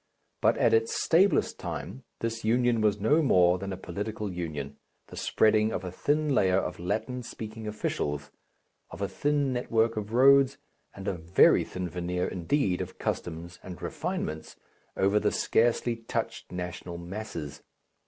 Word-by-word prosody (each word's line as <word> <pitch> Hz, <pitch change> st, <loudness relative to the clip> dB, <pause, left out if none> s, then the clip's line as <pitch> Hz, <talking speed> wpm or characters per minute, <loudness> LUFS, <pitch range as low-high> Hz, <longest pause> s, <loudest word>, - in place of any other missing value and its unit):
But -, -, +3 dB
at -, -, +3 dB
its 450 Hz, 0 st, +3 dB
stablest 185 Hz, +4 st, +3 dB
time, 130 Hz, -1 st, -6 dB, 0.2 s
this 115 Hz, 0 st, -3 dB
union 120 Hz, +1 st, +2 dB
was 105 Hz, -1 st, +2 dB
no 145 Hz, +10 st, +3 dB
more 90 Hz, -, +4 dB
than 100 Hz, +1 st, -5 dB
a 95 Hz, -, -4 dB
political 105 Hz, +3 st, -4 dB
union, 75 Hz, -5 st, -5 dB, 0.3 s
the -, -, -10 dB
spreading 110 Hz, 0 st, +3 dB
of -, -, -3 dB
a 90 Hz, -, -5 dB
thin 145 Hz, -, 0 dB
layer 95 Hz, -6 st, +3 dB
of 95 Hz, -, -2 dB
Latin 110 Hz, +8 st, -2 dB
speaking 110 Hz, -2 st, -7 dB
officials, 75 Hz, -8 st, -3 dB, 0.6 s
of 100 Hz, -, -6 dB
a -, -, +1 dB
thin 145 Hz, +6 st, 0 dB
network 115 Hz, -2 st, +1 dB
of 105 Hz, 0 st, -4 dB
roads 135 Hz, +2 st, +5 dB, 0.4 s
and 100 Hz, 0 st, -8 dB
a -, -, +1 dB
very 85 Hz, +1 st, +4 dB
thin 90 Hz, -1 st, -5 dB
veneer 90 Hz, +1 st, -2 dB
indeed 90 Hz, -, 0 dB
of -, -, -7 dB
customs 85 Hz, +1 st, -4 dB
and 90 Hz, -3 st, -9 dB
refinements, 80 Hz, 0 st, -4 dB, 0.4 s
over 100 Hz, +2 st, +3 dB
the 105 Hz, 0 st, +1 dB
scarcely 120 Hz, +1 st, +2 dB
touched 115 Hz, -, -4 dB
national 90 Hz, -1 st, -5 dB
masses. 85 Hz, -5 st, -6 dB
105 Hz, 155 wpm, -28 LUFS, 90-120 Hz, 0.6 s, roads